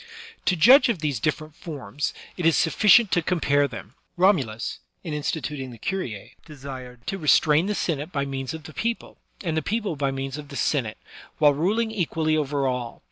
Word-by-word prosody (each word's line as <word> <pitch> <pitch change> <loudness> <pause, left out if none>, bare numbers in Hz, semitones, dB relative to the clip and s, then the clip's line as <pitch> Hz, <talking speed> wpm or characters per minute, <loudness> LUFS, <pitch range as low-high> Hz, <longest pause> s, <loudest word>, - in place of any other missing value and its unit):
To 185 - +3
judge 250 - +7
of 230 - +1
these 150 -6 -2
different 155 +4 -2
forms, 145 - -4 0.2
it 180 - -5
is 165 -1 +4
suflScient 210 +5 +5
to 175 - +3
compare 145 -5 +2
them. 115 -3 -9 0.2
Romulus, 140 - +1 0.2
in 165 -5 -5
instituting 150 -2 -3
the 120 - -11
curice^ 120 - -4
desired 130 -4 -10
to 195 - -3
restrain 155 +1 +4
the 210 - -1
Senate 155 -2 -2
by 140 -4 -1
means 135 +1 -4
of 160 - -9
the 155 - -11
people, 230 +6 -3 0.2
and 165 -4 -1
the 160 - +1
people 205 0 -2
by 140 -1 0
means 135 +1 -4
of 145 - -9
the 140 - -10
Senate, 130 -7 0 0.4
while 150 -2 +5
ruling 210 +10 0
equally 160 -6 0
over 145 -2 0
all. 125 -2 -3
150 Hz, 185 wpm, -24 LUFS, 135-175 Hz, 0.4 s, judge